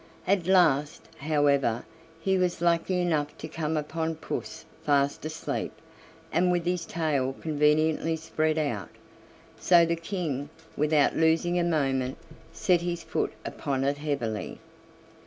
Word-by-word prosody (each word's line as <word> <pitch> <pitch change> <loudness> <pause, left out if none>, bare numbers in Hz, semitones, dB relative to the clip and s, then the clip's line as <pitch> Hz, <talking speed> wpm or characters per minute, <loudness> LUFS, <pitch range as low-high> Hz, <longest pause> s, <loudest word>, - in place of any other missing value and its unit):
At 190 -3 +1
last, 155 -6 +3 0.2
however, 140 -5 +2 0.3
he 190 +3 +1
was 180 -2 +1
lucky 170 +2 +2
enough 155 -4 0
to 155 - -6
come 160 0 -2
upon 160 +2 -2
puss 155 - -6 0.2
fast 140 -1 +1
asleep 160 +1 -3 0.6
and 180 +2 +3
with 175 -1 0
his 180 -1 -1
tail 145 -5 0
conveniently 155 +1 +2
spread 155 0 -1
out. 120 - -2 0.7
So 170 -2 +6
the 170 0 0
King, 165 -5 -3 0.3
without 150 -1 +3
losing 165 +2 +2
a - - +2
moment, 135 -6 0 0.3
set 180 -5 +2
his 175 -1 -3
foot - - -2
upon 135 -1 -2
it 140 +1 0
heavily. 135 -8 -3
155 Hz, 130 wpm, -27 LUFS, 145-170 Hz, 0.7 s, So